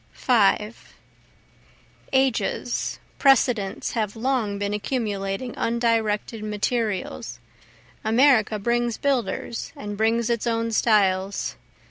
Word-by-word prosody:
5 215 -3 +1 1.2
Ages, 265 -2 0 0.2
precedents, 245 -7 +2
have 215 -3 -2
long 225 -4 -1
been 200 0 -2
accumulating 210 0 -2
undirected 230 -2 0
materials, 210 -1 -2 0.7
America 225 -1 +4
brings 235 +2 0
builders, 255 -4 -2
and 205 0 -6
brings 225 +2 +1
its 235 0 -1
own 230 0 0
styles. 200 -3 +1
225 Hz, 85 wpm, -24 LUFS, 210-240 Hz, 1.2 s, America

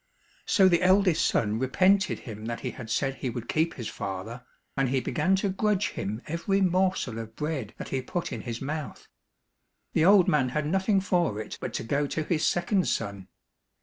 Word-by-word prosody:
So 190 -2 +5
the 170 -2 +3
eldest 185 -2 +4
son 110 0 0
repented 185 +10 +2
him 110 -2 -8
that 115 0 -4
he - - -3
had 115 -4 -9
said 135 +3 0
he 130 - -3
would 120 -1 -6
keep 160 +2 0
his 115 -5 -5
father, 100 +5 -6 0.3
and 135 -2 +1
he 135 +1 +1
began 160 +8 +1
to 195 +1 0
grudge 205 +1 +1
him 105 +4 -5
every 170 +5 0
morsel 185 - +1
of 110 0 -8
bread 150 -8 -4
that - - -7
he 130 - -1
put 170 +7 -4
in - - -5
his 120 +1 -5
mouth. 150 +1 -5 0.9
The 160 - +3
old 195 -1 +6
man 130 -4 +2
had 150 +3 -1
nothing 190 +4 +2
for 175 - 0
it 110 - -7
but - - -3
to - - -2
go 145 +5 0
to 155 - -2
his 155 0 -1
second 185 +2 +1
son. 100 -4 -3
150 Hz, 195 wpm, -27 LUFS, 115-185 Hz, 0.9 s, old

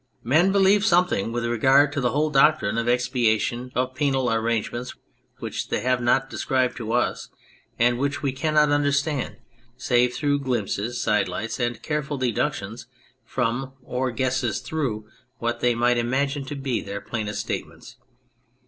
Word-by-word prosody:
Men 160 +10 +3
believed 200 +1 +4
something 175 - +2
with 120 0 -2
regard 135 +5 +4
to 140 - -1
the 125 - +2
whole 150 +3 0
doctrine 135 -6 +3
of 115 - -2
expiation, 125 0 +1
of 130 +1 0
penal 135 -2 +1
arrangements 115 +2 -2 0.4
which - - -5
they - - -1
have 125 0 +1
not 130 +2 +2
described 130 -2 0
to 115 -2 -4
us 120 - 0 0.5
and 120 +1 +2
which 140 +2 -1
we 140 - +1
cannot 150 +2 +2
understand 145 -1 0 0.4
save 125 -1 +2
through 145 -1 +1
glimpses, 120 -3 -2
side 105 - +1
lights, 115 +4 -4
and 120 -1 -2
careful 150 -1 -2
deductions 125 -4 -2 0.4
from 130 +3 -2
or 125 +1 -2
guesses 125 -3 -1
through 120 -9 -3 0.3
what 120 0 -2
they 120 0 +2
imagine 125 +4 +1
to 145 - -6
be 135 -4 -2
their 100 0 -5
plainest 105 +1 -4
statements. - - -6
125 Hz, 150 wpm, -24 LUFS, 120-140 Hz, 0.5 s, believed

